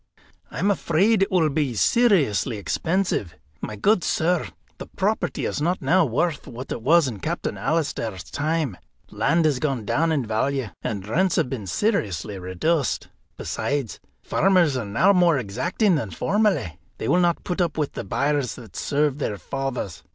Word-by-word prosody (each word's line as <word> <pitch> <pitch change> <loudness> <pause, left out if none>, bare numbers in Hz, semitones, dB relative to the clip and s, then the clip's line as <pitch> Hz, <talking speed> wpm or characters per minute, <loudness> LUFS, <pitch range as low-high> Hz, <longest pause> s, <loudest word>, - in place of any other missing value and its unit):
"I - - -9
am 205 - +2
afraid 195 +3 +2
it 195 - +2
will 165 -5 +3
be 140 -5 -1
seriously 145 - +3
expensive. 160 - -1 0.3
My 105 - -5
good 190 - +2
sir, 175 +1 +1 0.3
the - - -7
property - - -1
is - - -2
not 175 +4 +1
now 185 0 +3
worth 150 +6 -1
what 125 +3 -8
it - - -3
was 160 +4 +4
in 110 -6 -5
Captain - - -3
Alister's 115 - -2
time. 150 - -2 0.3
Land 165 +1 +2
has 145 -5 +2
gone 135 -7 -1
down 160 +8 +1
in 140 -6 0
value, 115 +3 -1
and 100 -2 -4
rents 175 - +1
have 125 - 0
been 110 -7 -4
seriously 105 - -1
reduced. 125 - -1 0.3
Besides, 140 -6 -3 0.2
farmers 180 -7 +3
are 125 -4 -2
now 160 - +3
more 175 -5 +4
exacting 130 - 0
than 145 -10 -1
formerly; 160 - 0 0.2
they - - -4
will 180 - +3
not 175 -1 +1
put 180 0 -2
up 170 -3 -1
with 150 -2 -1
the - - -5
byres 140 -2 0
that 115 -6 -13
served 145 -1 0
their 105 -7 -2
fathers. 135 - -4
145 Hz, 165 wpm, -24 LUFS, 115-175 Hz, 0.3 s, was